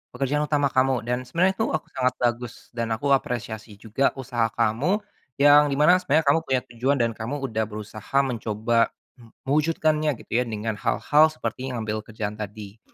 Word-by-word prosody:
pekerjaan 145 +3 0
utama 145 -2 +1
kamu. 130 -2 +2
Dan 125 +2 -3
sebenarnya 180 +8 +2
itu, 220 - +1
oh 155 - -2
sangat 130 -1 0
bagus, 120 0 -3
dan 115 -2 -2
aku 140 +5 -1
apresiasi 115 -5 -1
juga 110 +6 -1
usaha 120 -3 -1
kamu, 125 - +1 0.3
yang 145 +1 +6
di 140 - -1
mana 170 +6 +5
sebenarnya 160 -2 +1
kamu 165 - +3
punya 130 -1 +1
tujuan 125 +4 +1
dan 115 -1 +2
kamu 125 +6 -5
udah 110 -4 -1
berusaha 110 +4 -5
mencoba, 115 -2 0 0.3
m 115 -2 -18
mewujudkannya 155 0 +1
gitu - - -28
ya 125 - -1
dengan 110 -1 -4
hal-hal 150 +2 +3
seperti 145 -4 -5
ngambil 110 -2 -2
kerjaan 105 -1 -5
tadi. 105 0 -8
125 Hz, 170 wpm, -24 LUFS, 110-145 Hz, 0.3 s, yang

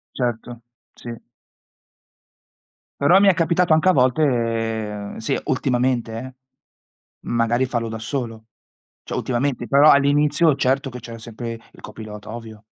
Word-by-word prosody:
Certo, 120 -1 -3 0.3
sì. 120 - -8 1.9
Però 170 +7 +6
mi 200 - +4
è 195 - +6
capitato 170 0 +2
anche 160 +4 +4
a - - +7
volte 115 - 0
sì, 110 - -1
ultimamente, 125 -4 0
eh, 130 +3 -7 1.0
magari 120 +2 +1
farlo 120 -2 -2
da 110 - -5
solo. 115 -2 -5 0.6
Cioè, - - -6
ultimamente, 125 0 -2
però 145 +2 +6
all'inizio, 145 +3 +3
certo 135 +2 0
che 125 - -8
c'era 115 0 -9
sempre 115 0 -7
il - - -17
copilota, 110 0 -9
ovvio. 110 -2 -10
120 Hz, 125 wpm, -21 LUFS, 115-140 Hz, 1.9 s, a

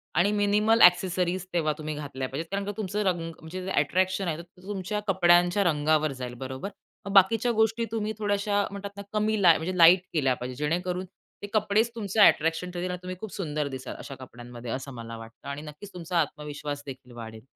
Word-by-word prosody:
आणि 200 +4 +4
minimal 210 +2 +3
accessories 180 0 +4
तेव्हा 155 -3 +1
तुम्ही 155 -1 -4
घातल्या 135 -3 -5
पाहिजेत. 155 +5 -4
कारण 200 0 -2
का 205 - -2
तुमचं 210 0 -2
रंग 170 -3 0
तुमचं 180 +3 -7
जे 190 - -3
ॲट्रॅक्शन 185 +5 +1
आहे 160 -2 -1
ते 180 +1 -20
तुमच्या 205 +1 -3
कपड्यांच्या 175 +1 +4
रंगावर 155 -2 +2
जाईल 125 -1 -4
बरोबर? 130 +9 -5 0.4
मग 200 - -4
बाकीच्या 225 +5 +5
गोष्टी 225 +1 +2
तुम्ही 220 -1 -2
थोड्याशा 205 0 +1
म्हणतात 200 0 -6
ना 200 - -5
कमी 215 0 +1
लाई 170 -3 +7
म्हणजे 180 +3 -3
लाईट 175 +2 +8
केल्या 135 -5 +2
पाहिजेत. 125 +1 -6
जेणेकरून 180 +2 -1 0.4
ते 205 - -5
कपडेच 215 +2 +2
तुमचं 215 -1 -3
ॲट्रॅक्शन 165 +1 +4
ठरतील 180 +1 -3
आणि 180 - -4
तुम्ही 185 0 -5
खूप 215 -5 -7
सुंदर 150 -6 -2
दिसाल 130 -1 -6
अशा 135 - -8
कपड्यांमध्ये. 120 -1 -9
असं 135 +1 -4
मला 115 -1 -7
वाटतं 115 +4 -12
आणि 140 +1 -5
नक्कीच 155 +7 -10
तुमचा 175 0 -3
आत्मविश्वास 145 -1 -5
देखील 130 -2 -10
वाढेल. 110 -1 -8
175 Hz, 190 wpm, -27 LUFS, 150-200 Hz, 0.4 s, लाईट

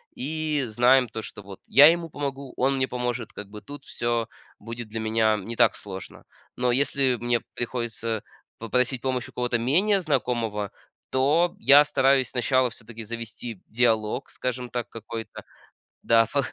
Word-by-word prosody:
и 155 +1 -2
знаем 125 +3 +4
то, 110 +1 -5
что 105 -1 -9
вот 95 -1 -11
я 140 +5 +8
ему 170 -1 -3
помогу, 140 -2 -5
он 135 +1 +2
мне 130 0 +1
поможет, 125 -2 -3
как 105 -1 -9
бы 105 0 -9
тут 145 -1 -11
всё 120 -1 -1 0.3
будет 115 +2 -8
для 110 +1 -5
меня 110 0 +2
не 110 +4 -6
так 120 -2 +4
сложно. 95 -2 -8 0.3
Но 125 0 +1
если 135 0 +2
мне 120 -1 +1
приходится 115 -2 -3 0.3
попросить 125 +2 0
помощь 130 -2 -2
у - - -14
кого-то 120 -1 -1
менее 185 - +3
знакомого, 120 - -1 0.4
то 150 +7 +2
я 145 +1 +7
стараюсь 135 -3 +2
сначала 130 0 +1
всё-таки 115 -1 -10
завести 115 -1 -6
диалог, 115 +1 +1
скажем 125 -1 -4
так, 120 -1 -4
какой-то. 115 0 -8 0.6
Да, 115 0 +4
па 140 -1 +2
120 Hz, 155 wpm, -25 LUFS, 115-135 Hz, 0.6 s, я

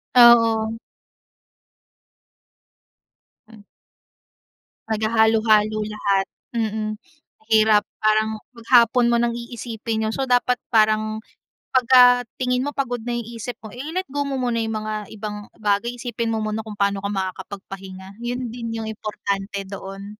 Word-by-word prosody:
Oo. 230 -2 +6 2.7
Hmm. 220 -2 -15 1.3
Maghalo-halo 220 -1 +3
lahat, 200 -2 0 0.3
mm. 220 -1 -1 0.5
Mahirap 220 -1 +4 0.2
parang 215 0 +2 0.2
maghapon 235 +1 +4
mo 235 - +3
nang 235 0 +1
iisipin 230 -2 -4
yun. 220 - -2
So 270 - -1
dapat 245 0 +2
parang 215 0 +2 0.5
pagka 245 -1 +6
tingin 250 +1 0
mo 290 - -5
pagod 245 -3 -2
na 240 0 -2
isip 235 +1 -5
mo, 215 - -9
eh, 245 - -11
ile-let 325 +7 -3
go 285 0 -1
mo 275 - -2
muna 245 -3 0
yung 220 -1 -2
mga 215 -1 -4
ibang 210 -1 -6
bagay. 210 +3 0
Isipin 235 -1 -4
mo 220 - -1
muna 215 +1 -3
kung 215 - -7
paano 200 -1 +1
ka 200 - -3
makakapagpahinga. 190 0 -6
'Yon 245 0 -4
din 235 -1 -6
yung 225 -1 -4
importante 200 -2 -4
doon. 195 +2 -8
220 Hz, 130 wpm, -22 LUFS, 210-240 Hz, 2.7 s, Oo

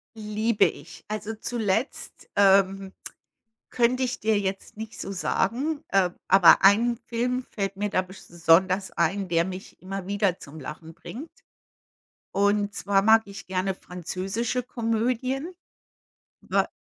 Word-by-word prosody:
Liebe 215 0 +1
ich. 155 +4 -6
Also 215 +1 -4
zuletzt, 225 +2 -3
ähm, 195 -1 +3 0.8
könnte 250 +1 +2
ich 255 0 -1
dir 220 0 +1
jetzt 195 0 -4
nicht 220 +1 -8
so 195 - -5
sagen, 255 - -1
ähm, 185 -3 +3
aber 190 -2 +7
ein 230 +5 +5
Film 250 +2 -1
fällt 195 -2 -3
mir 205 +1 -1
da 185 - +1
besch 190 +1 -13
sonders 180 +3 +2
ein, 185 +4 0
der 170 0 +2
mich 190 +1 -8
immer 190 0 -6
wieder 200 -3 0
zum 150 +2 -11
Lachen 155 +3 -8
bringt. 250 - -9 1.0
Und 205 +1 +1
zwar 195 -1 +1
mag 220 +2 +6
ich 200 -1 -10
gerne 190 +1 -1
französische 190 +8 -3
Komödien. 250 +6 -1 0.9
Wa - - 0
200 Hz, 130 wpm, -26 LUFS, 190-230 Hz, 1.0 s, aber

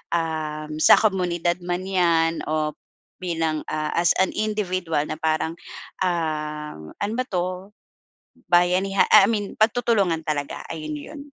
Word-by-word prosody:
uhm, 155 -2 -3
sa - - +8
komunidad 175 -4 0
man 180 +1 -2
'yan 170 -3 +2
o 155 -1 -1 0.5
bilang, 165 -3 -1
ah, 155 0 -2
as 170 -1 +3
an 190 - +2
individual 185 -8 -1
na - - -3
parang, 160 0 0 0.5
uhm, 150 - -3
ano 205 +2 -2
ba 255 - +1
'to 180 -2 -1 1.1
bayaniha 180 +3 +3
I 200 +3 +8
mean, 205 -3 -2
pagtutulungan 215 -7 +2
talaga 145 -2 -3
ayun 155 -1 -5
'yon. 285 - -9
170 Hz, 125 wpm, -23 LUFS, 155-190 Hz, 1.1 s, sa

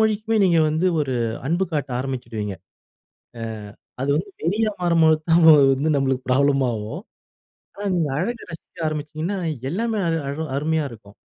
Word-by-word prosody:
மொழிக்குமே 220 +1 +1
நீங்க 170 -3 +4
வந்து 160 +4 +1 0.2
ஒரு 135 -3 -2 0.3
அன்பு 180 +3 +1
காட்ட 145 -3 -2
ஆரம்பிச்சுடுவீங்க. 120 -6 -4 0.9
அ - - -6 0.6
அது 135 - -1
வந்து 200 +5 -4
வெறியா 210 +6 +1
மாறும்போது 165 -2 +4
தான் 165 +1 +5 0.3
வந்து 145 +4 -1
நம்மளுக்கு 130 -1 0
ப்ராப்ளம் 140 +1 +3
ஆகும். 110 - -5 0.7
ஆனா 205 - -7
நீங்க 165 -4 +1
அழக 230 +7 -2
ரசிக்க 165 - -12
ஆரம்பிச்சிட்டீங்கன்னா 155 +5 -3 0.3
எல்லாமே 220 +5 -1
அழ 165 - +1 0.2
அழ 140 - -3 0.2
அருமையா 155 +1 0
இருக்கும். 105 -3 -14
155 Hz, 145 wpm, -22 LUFS, 135-180 Hz, 0.9 s, தான்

